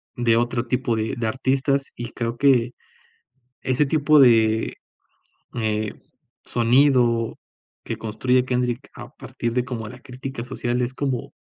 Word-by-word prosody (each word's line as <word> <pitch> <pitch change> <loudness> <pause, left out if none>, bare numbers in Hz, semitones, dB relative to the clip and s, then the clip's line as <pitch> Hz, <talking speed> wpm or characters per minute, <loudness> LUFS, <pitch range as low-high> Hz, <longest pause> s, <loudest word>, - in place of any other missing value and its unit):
de 115 -2 +2
otro 120 0 0
tipo 120 -1 0
de 110 0 -2
de 115 -2 -1
artistas. 135 +3 0
Y 120 0 -6
creo 115 -1 -3
que 125 -3 +3 0.9
ese 130 +3 +1
tipo 150 0 +4
de, 110 -3 +4 0.8
eh, 110 -2 -1 0.5
sonido 120 -1 +3 0.5
que - - -3
construye 125 +4 0
Kendrick 125 0 -2
a - - -9
partir 115 - -5
de 125 0 0
como, 115 -4 -5
la 125 +3 -11
crítica 130 -1 -7
social 125 -1 -2
es 125 +2 -2
como 135 -4 -3
125 Hz, 135 wpm, -23 LUFS, 115-130 Hz, 0.9 s, tipo